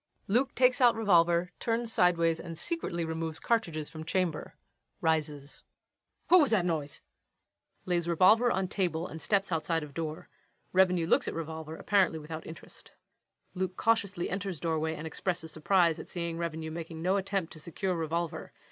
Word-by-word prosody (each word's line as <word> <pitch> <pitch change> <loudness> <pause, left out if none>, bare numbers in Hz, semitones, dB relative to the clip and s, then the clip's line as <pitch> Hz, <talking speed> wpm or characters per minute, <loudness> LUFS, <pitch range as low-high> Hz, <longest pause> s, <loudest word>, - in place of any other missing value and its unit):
LUKE. 245 +6 +1
[Takes 255 +1 +4
out 245 -1 +6
revolver, 175 -5 +3
turns 230 0 -1
sidewise 170 -2 +3
and 165 -2 -7
secretly 170 - -1
removes 160 0 -3
cartridges 170 -10 -1
from 155 -1 -8
chamber. 165 -2 -2 0.4
Rises.] 150 -3 -1 0.7
What 365 +2 +8
wuz 295 - +5
that 205 -6 +2
noise? 155 -5 -3 0.8
[Lays 175 -2 0
revolver 215 +8 +5
on 190 0 0
table 175 -3 -1
and 160 -2 -8
steps 200 -2 +1
outside 165 0 0
of 145 -1 -10
door. 155 0 -5 0.5
REVENUE 180 -2 +4
looks - - +2
at - - -3
revolver, 160 -1 -5
apparently 195 -3 +2
without 160 +1 -7
interest. 160 - -12 0.6
[LUKE 185 0 -3
cautiously 200 -6 +1
enters 195 -3 -4
doorway 160 0 -1
and 155 - -7
expresses 165 0 -3
surprise 165 +1 +2
at - - -8
seeing 170 -1 -4
REVENUE 160 -1 -4
_making 165 0 -6
no 190 +3 +2
attempt 195 -3 -2
to 160 - -11
secure 180 +4 -3
revolver. 165 0 -3
170 Hz, 155 wpm, -30 LUFS, 160-195 Hz, 0.8 s, What